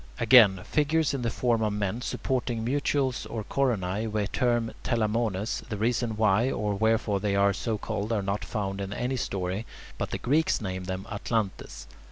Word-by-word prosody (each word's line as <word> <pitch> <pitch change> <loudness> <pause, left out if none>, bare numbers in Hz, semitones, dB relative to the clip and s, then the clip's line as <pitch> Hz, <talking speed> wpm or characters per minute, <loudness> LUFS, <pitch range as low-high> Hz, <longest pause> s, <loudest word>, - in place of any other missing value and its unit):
Again, 110 -6 +7
figures 155 0 +1
in 135 - -2
the 115 - 0
form 115 -1 +1
of 105 -1 +1
men 105 +3 -2
supporting 125 -3 -2
mutules 135 -1 0
or 110 -2 -4
coronae, 110 -5 0
we 105 -1 0
term 120 +1 0
"telamones" 110 -2 0
the 105 - -3
reasons 115 0 0
why 110 +3 +3
or 105 -5 -1
wherefore 110 -1 +1
they 100 0 0
are 100 0 +4
so 110 +3 -2
called 105 +2 -3
are 105 -3 0
not 100 +1 -2
found 100 0 -3
in 100 0 -4
any 125 +5 -2
story 95 -3 -2 0.4
but - - -2
the - - -2
Greeks 150 +6 +1
name 95 -3 -4
them 95 0 -3
[Greek: 105 - -8
atlantes]. 100 - -2
110 Hz, 180 wpm, -27 LUFS, 100-120 Hz, 0.4 s, Again